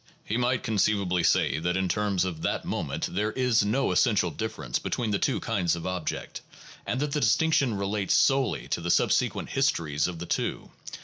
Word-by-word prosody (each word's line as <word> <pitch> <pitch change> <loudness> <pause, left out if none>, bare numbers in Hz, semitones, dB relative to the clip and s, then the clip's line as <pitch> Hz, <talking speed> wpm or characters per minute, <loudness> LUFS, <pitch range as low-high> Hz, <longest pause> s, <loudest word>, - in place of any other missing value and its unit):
He 110 - -2
might 125 0 0
conceivably 100 -4 +1
say 80 - +2
that 90 +2 -1
in 95 0 0
terms 100 -1 0
of 85 -4 -5
that - - -1
moment - - -3
there 105 +4 -1
is 125 -4 +2
no 115 +7 +1
essential 105 -5 +2
difference 110 - -3
between 115 -3 -2
the 100 - +1
two 135 - 0
kinds 90 -7 0
of 85 - -7
object, 90 -3 -4 0.5
that 125 - -1
the 150 - 0
distinction 135 0 +2
relates 100 0 0
solely 135 -2 +2
to - - -1
the 85 - -3
subsequent - - +1
histories 85 - 0
of 90 -2 -5
the 85 - -6
two. - - -3
105 Hz, 180 wpm, -27 LUFS, 90-120 Hz, 0.5 s, say